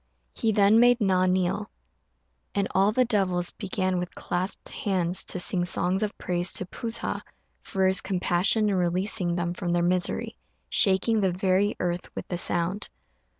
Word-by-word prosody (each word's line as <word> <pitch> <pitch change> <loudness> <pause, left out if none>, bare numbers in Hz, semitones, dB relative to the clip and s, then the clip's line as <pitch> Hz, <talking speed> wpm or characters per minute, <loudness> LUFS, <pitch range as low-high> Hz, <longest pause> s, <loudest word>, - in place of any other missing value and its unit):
He 225 - 0
then 205 +1 +4
made 245 +1 +5
Na 185 -3 +2
kneel, 185 -1 0 0.9
and 200 -1 +1
all 195 +2 +3
the 255 +3 +2
devils 185 -6 0
began 185 -2 -2
with 180 0 -6
clasped 185 +2 -3
hands 185 -3 0
to - - +1
sing 175 0 +3
songs 180 +2 0
of 210 -1 -3
praise 175 0 -1
to 185 - -1
P'u 230 +5 -6
sa 230 - -2 0.4
for 190 -1 -1
his 190 +1 +5
compassion 190 +3 +1
in 200 - 0
releasing 180 0 0
them 175 0 -2
from 175 -1 -3
their 175 0 +1
misery, 180 0 -1 0.3
shaking 210 +2 +3
the 190 - +2
very 190 +3 +1
earth 175 0 -3
with - - -6
the 175 - -2
sound. 175 +4 -1
185 Hz, 165 wpm, -26 LUFS, 175-200 Hz, 0.9 s, made